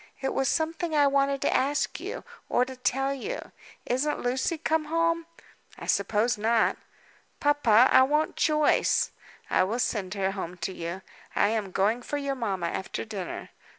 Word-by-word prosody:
"It 270 0 -2
was 270 0 +1
something 325 0 -1
I 290 -1 +5
wanted 275 0 +2
to - - +2
ask 285 +2 0
you, - - -6 0.3
or 250 - +3
to 260 0 -8
tell 270 +2 0
you. 420 - -5 0.3
Isn't 280 +5 0
Lucy 260 +7 0
come 315 0 0
home?" 330 +1 0 0.5
"I - - -8
suppose 215 +1 +1
not." 225 +1 +2 0.6
"Papa, 260 -5 +5
I 260 - +7
want 300 +4 +2
Joyce." 305 -1 +2 0.4
"I - - +4
will 210 +6 -1
send 210 -5 -1
her 195 -1 0
home 180 -2 -6
to 175 +2 -4
you. 170 +2 -5 0.3
I 205 - +3
am 215 -3 -1
going 205 +6 +1
for 290 - -3
your 280 -1 -2
mamma 200 -9 -2
after 190 - -4
dinner." 200 -5 -6
260 Hz, 165 wpm, -27 LUFS, 210-290 Hz, 0.6 s, I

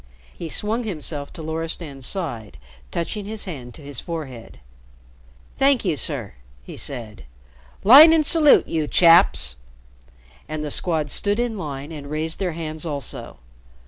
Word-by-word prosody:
He 165 - -7
swung 220 +8 -1
himself 150 -7 -5
to 160 - -9
Loristan's 160 -4 -5
side, 120 - -4 0.3
touching 195 - -4
his 215 +1 -3
hand 130 - -8
to 155 - -14
his 140 -4 -5
forehead. 135 -9 -8 1.0
"Thank 270 -4 +3
you, 170 -5 +1
sir," 135 -8 -2 0.3
he - - -10
said. 110 - -4 0.6
"Line 280 +10 +10
and 320 -2 +3
salute, 300 -2 +5
you 155 -2 -2
chaps!" 165 - +5 0.9
And 155 0 -4
the 150 - -5
Squad 155 -3 -1
stood 205 +2 0
in 240 -2 -1
line 145 -5 -6
and 145 -3 -8
raised 155 +2 -3
their 185 -4 -2
hands 155 -1 -4
also. 145 -4 -5
160 Hz, 145 wpm, -22 LUFS, 140-195 Hz, 1.0 s, Line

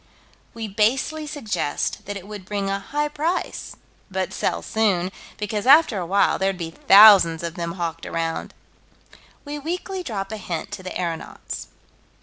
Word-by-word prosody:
We 225 -1 -4
basely 255 +9 0
suggest 225 - -3
that 205 0 -4
it 195 0 -11
would 205 -2 -8
bring 200 0 -2
a 195 - -1
high 295 +9 -2
price 315 +4 -3 0.3
but 190 -1 -2
sell - - -1
soon, 195 -5 +1 0.3
because 210 +1 -3
after 280 -7 +6
a 175 - -4
while 200 +3 +3
there'd 195 0 0
be 165 -2 -5
thousands 195 -4 +7
of 170 -1 -3
them 170 -1 -4
hawked 165 -2 -4
around 165 -1 -3 0.9
We 295 +1 -5
weakly 360 +5 -4
drop 210 - -4
a 220 - -4
hint 175 -4 -5
to 205 -2 -6
the 185 - -5
aeronauts. 170 -2 -5
200 Hz, 155 wpm, -23 LUFS, 180-240 Hz, 0.9 s, thousands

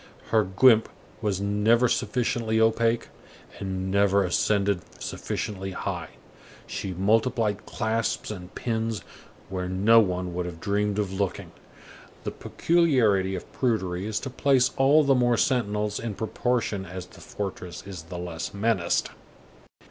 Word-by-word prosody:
Her 110 -1 +4
guimpe 110 +4 +5 0.3
was 100 -4 0
never 105 +4 +3
sufficiently 115 -1 0
opaque, 115 +1 +2 0.5
and 95 -1 -3
never 100 0 +3
ascended 100 +1 +1 0.2
sufficiently 95 -2 -4
high. - - -4 0.6
She 95 - -4
multiplied 110 +2 +1
clasps 115 -2 -1
and 90 -3 -8
pins 115 -2 -2 0.5
where 90 -1 -3
no 105 +5 +5
one 90 -4 0
would 90 0 -2
have 85 -2 -8
dreamed 100 +3 0
of 100 -3 -1
looking. 95 -3 -2 0.7
The - - -3
peculiarity 120 - +2
of 90 - -8
prudery 95 -7 -1
is 110 -1 -1
to 135 - -5
place 130 -1 +3
all 140 +3 +5
the 140 -1 +4
more 120 -2 +3
sentinels 105 -5 0
in 115 -3 -4
proportion 110 -1 -1
as 90 0 -7
the - - -16
fortress 95 -3 -6
is 95 -4 -7
the 85 +2 -8
less 85 +1 -5
menaced. 100 -4 +1
105 Hz, 135 wpm, -26 LUFS, 95-115 Hz, 0.7 s, guimpe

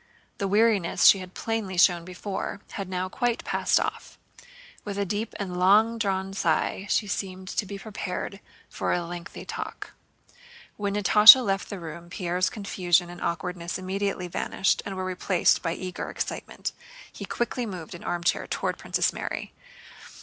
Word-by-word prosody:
The 200 - 0
weariness 205 -3 +3
she 195 - +8
had 185 0 -10
plainly 220 -5 -3
shown 175 -1 +4
before 190 +2 -5
had 195 -2 -5
now 185 0 -2
quite 240 +3 -1
passed - - +2
off. - - -4 0.7
With 200 -1 -5
a 200 - 0
deep 210 +4 -3
and 180 -3 -3
long 215 +5 +4
drawn 195 -2 -1
sigh 190 +2 0
she 215 - +2
seemed 190 -1 -4
to 205 - -2
be 200 +1 -6
prepared 195 -1 -5 0.3
for - - -2
a 175 -1 0
lengthy 175 0 -8
talk. - - -6 0.8
When 205 -1 -2
Natásha 210 +4 +9
left 195 0 -1
the 200 - -5
room 170 +1 -8
Pierre's 180 +1 0
confusion 180 -4 +1
and 175 - -10
awkwardness 175 0 -3
immediately 190 0 -2
vanished 190 +2 0
and 195 - -4
were 185 0 -3
replaced 185 -1 +2
by 165 -2 -1
eager 185 0 -5
excitement. - - -4 0.4
He - - -8
quickly 240 0 -2
moved 180 -5 -7
an 175 - -9
armchair 175 0 0
toward - - -2
Princess - - 0
Mary. - - -5
190 Hz, 155 wpm, -26 LUFS, 180-205 Hz, 0.8 s, Natásha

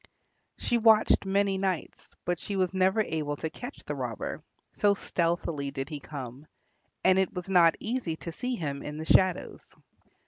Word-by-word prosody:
She 240 - +1
watched 220 -3 +5
many 195 0 +2
nights, 190 -4 -3
but 175 -1 0
she 200 - -4
was 185 -1 +1
never 190 +3 +3
able 155 -6 -2
to 160 +2 -4
catch 245 +4 -8
the - - -4
robber, - - -4 0.3
so 205 -1 +3
stealthily 170 -6 -1
did 135 -1 -5
he 150 - -5
come, 135 0 -8 0.6
and 185 0 +5
it 190 - +1
was 180 0 -5
not 175 -3 +5
easy 225 -8 -2
to 170 - -7
see 250 +9 -3
him 140 -8 -3
in 150 0 -6
the 160 - -5
shadows. 185 +1 +2
180 Hz, 170 wpm, -28 LUFS, 155-195 Hz, 0.6 s, watched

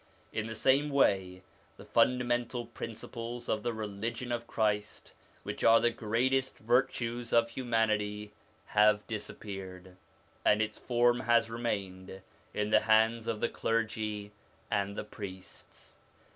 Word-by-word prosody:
In 110 0 -2
the 110 - -5
same 135 +6 +3
way 95 -9 +2 0.3
the - - -12
funda 125 0 +3
mental 120 0 -1
principles 115 +1 -7
of 110 - 0
the 120 - -1
religion 110 +3 -4
of 120 0 -3
Christ, 105 -2 -1 0.3
which - - -5
are 115 0 +7
the 120 - +2
greatest 130 +5 0
virtues 120 0 0
of 115 0 +4
humanity, 105 -4 0 0.3
have 105 0 +4
disappeared, 95 -4 -7 0.5
and 105 - +4
its 110 0 -2
form 120 0 +2
has 115 -2 +2
remained 95 -5 -4 0.3
in 105 0 -2
the 110 - +7
hands 110 +1 +3
of 115 -2 -2
the 120 - +1
clergy 110 -2 -2 0.4
and 100 -1 0
the - - -3
priests. 95 -3 -11
110 Hz, 130 wpm, -31 LUFS, 105-120 Hz, 0.5 s, are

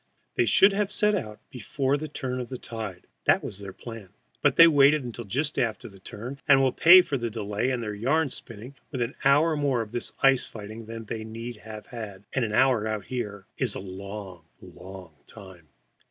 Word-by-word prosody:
They 120 - +1
should 195 - +6
have 205 0 0
set 210 0 +3
out 110 - -3
just - - -44
before 135 +2 -1
the 155 +2 -4
turn 130 -4 -4
of 125 - -5
tide 110 -6 -7 0.2
(that - - +4
was 100 - -6
their 100 -1 -7
plan), 115 -1 -10 0.3
but - - +3
they 165 - +9
waited 145 -1 +5
until 120 -1 -7
just 145 +9 -1
after 115 -3 -1
the 100 -3 -15
turn, 120 +8 -8
and 135 -2 +7
will 135 -1 +3
pay 180 +7 +8
for 140 -6 -2
the 120 0 -2
delay 105 +2 -2
and 125 -2 -2
their 105 -1 -4
yarn 140 +9 +1
spinning 115 +1 -7 0.2
with 130 -4 -1
an 120 - -4
hour 150 +4 +4
more 140 -5 +1
of 105 - -13
this 120 0 -3
ice 135 -2 +4
fighting 110 +1 -9
than 115 0 -7
they 110 0 -5
need 115 +1 -7
have 110 0 -10
had 105 -5 -8
and 130 - +1
an 110 - -2
hour 120 -1 +3
out 105 -3 -3
there 105 -6 -4
is 125 -6 -1
a - - -4
long, 95 -2 -8
long 95 -2 -12
time. 95 -7 -13
115 Hz, 210 wpm, -26 LUFS, 105-135 Hz, 0.3 s, they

